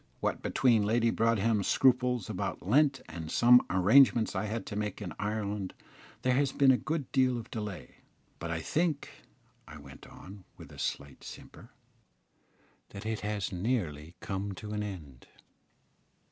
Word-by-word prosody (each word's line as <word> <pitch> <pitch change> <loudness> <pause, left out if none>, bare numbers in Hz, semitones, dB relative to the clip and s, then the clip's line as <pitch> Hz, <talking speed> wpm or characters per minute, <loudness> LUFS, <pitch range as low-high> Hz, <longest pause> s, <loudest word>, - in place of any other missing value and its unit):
What - - -2
between 115 -4 +2
Lady 115 +2 +2
Broadhem's 115 -3 +1
scruples 125 -4 +2
about - - -4
Lent 135 +4 +3
and 80 -1 -7
some 120 +6 +6
arrangements 110 +5 +4
I - - -1
had 110 +2 -4
to 105 - -6
make 105 -1 -3
in 90 -7 -6
Ireland, 105 -2 -3 0.5
there 125 - +2
has 135 +1 +2
been 135 -2 +5
a - - +5
good 155 -2 -4
deal 130 -2 +2
of 115 - -8
delay, 105 - -6 0.4
but 85 - -5
I 80 -1 -2
think," 155 - -1 0.6
I 80 - -10
went 70 -2 -13
on, 95 +1 -12
with - - -12
a - - -12
slight 70 -1 -4
simper, - - -12 1.2
"that 100 - -9
it 110 -1 -2
has 105 -2 -3
nearly 90 - -2
come 100 0 -4
to 105 +2 -8
an 105 0 -2
end." 80 -11 -8
105 Hz, 155 wpm, -30 LUFS, 95-125 Hz, 1.2 s, some